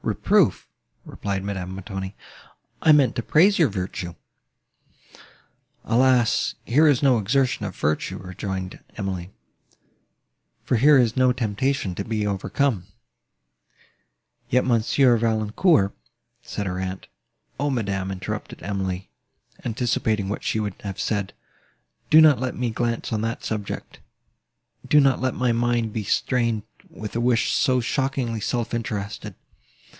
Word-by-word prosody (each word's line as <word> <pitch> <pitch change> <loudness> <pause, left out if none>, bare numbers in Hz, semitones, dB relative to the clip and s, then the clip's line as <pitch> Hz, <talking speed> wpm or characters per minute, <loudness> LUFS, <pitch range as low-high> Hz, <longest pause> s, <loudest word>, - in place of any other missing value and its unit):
"Reproof!" - - +2 0.4
replied 100 -1 -4
Madame 95 -2 -4
Montoni: 95 0 -6 0.7
"I 160 - +5
meant 145 -4 +4
to - - +1
praise 180 - +4
your 165 - +5
virtue." 90 -3 -5 1.7
"Alas! 125 0 +3
here 150 +6 +4
is 145 -2 +3
no 130 -4 +4
exertion 125 +1 +1
of 95 - -8
virtue," 75 +1 -1
rejoined 95 0 -5 0.2
Emily, 95 -4 -4 1.3
"for 125 - +1
here 145 +5 +6
is 120 -3 +3
no 130 -1 +4
temptation 125 -2 -1
to 100 - -4
be 105 0 -2
overcome." 100 +1 -1 1.6
"Yet 125 +1 +2
Monsieur 120 +1 +3
Valancourt—" 110 - +2 0.5
said 100 - -5
her 90 -1 -3
aunt. 95 0 -4 0.5
"O, 145 +1 +1
madam!" 100 -7 -2
interrupted 95 -1 -6
Emily, 95 -2 -3 0.5
anticipating 110 -3 -1
what 105 - -4
she 110 - 0
would 105 -3 -2
have 100 -2 -6
said, 100 -3 -1 0.8
"do 155 - +8
not 155 -5 +7
let 130 0 -2
me 125 -2 -1
glance 115 0 -2
on 105 - 0
that 115 +1 -3
subject: 105 -3 -5 0.9
do 150 - +6
not 135 -3 +3
let 130 -1 0
my 125 -1 +1
mind 120 -1 0
be 110 - -2
stained 115 0 0 0.3
with 105 0 -8
a 120 - 0
wish 120 -1 +2
so 130 -2 +2
shockingly 125 -2 -1
self 120 +2 -2
interested." 110 -3 -4
115 Hz, 130 wpm, -24 LUFS, 100-125 Hz, 1.7 s, do